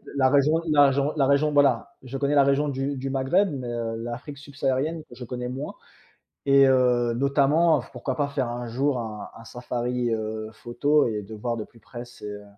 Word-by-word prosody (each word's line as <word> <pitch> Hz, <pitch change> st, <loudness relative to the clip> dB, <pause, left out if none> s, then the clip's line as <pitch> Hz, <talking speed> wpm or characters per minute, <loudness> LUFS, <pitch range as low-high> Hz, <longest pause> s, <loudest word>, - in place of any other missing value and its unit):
la 130 Hz, -2 st, +4 dB
raison 145 Hz, +4 st, +3 dB
la 145 Hz, -2 st, +6 dB
jon 140 Hz, +2 st, 0 dB
la 135 Hz, -2 st, +3 dB
région, 140 Hz, +2 st, +3 dB
voilà, 140 Hz, -5 st, +2 dB
je 130 Hz, +1 st, -6 dB
connais 140 Hz, +1 st, 0 dB
la 140 Hz, -, +6 dB
région 140 Hz, +2 st, +2 dB
du 140 Hz, +1 st, -2 dB
du 135 Hz, +1 st, -4 dB
Maghreb, 135 Hz, +10 st, +2 dB
mais, 130 Hz, -4 st, -5 dB
heu, 115 Hz, -1 st, -3 dB
l'Afrique 120 Hz, +5 st, -6 dB
subsaharienne 145 Hz, +3 st, -2 dB
que 125 Hz, -, -17 dB
je 125 Hz, 0 st, -8 dB
connais 125 Hz, +1 st, -5 dB
moins, 135 Hz, +4 st, -5 dB, 0.7 s
et 140 Hz, 0 st, +6 dB
heu, 125 Hz, -2 st, +3 dB
notamment 140 Hz, +3 st, +3 dB
f -, -, -16 dB
pourquoi 130 Hz, 0 st, -4 dB
pas 145 Hz, +2 st, 0 dB
faire 135 Hz, -4 st, -2 dB
un 120 Hz, 0 st, -5 dB
jour 130 Hz, +3 st, 0 dB
un 110 Hz, -3 st, -6 dB
un 115 Hz, -, -13 dB
safari, 125 Hz, 0 st, -3 dB
heu, 110 Hz, 0 st, -4 dB
photo 140 Hz, +6 st, +1 dB
et 105 Hz, -2 st, -3 dB
de 105 Hz, +3 st, -10 dB
voir 115 Hz, +2 st, -3 dB
de 110 Hz, -, -4 dB
plus 115 Hz, -, -19 dB
près 120 Hz, +1 st, -9 dB
ces, 120 Hz, -3 st, -13 dB
heu, 105 Hz, 0 st, -8 dB
130 Hz, 210 wpm, -25 LUFS, 120-140 Hz, 0.7 s, la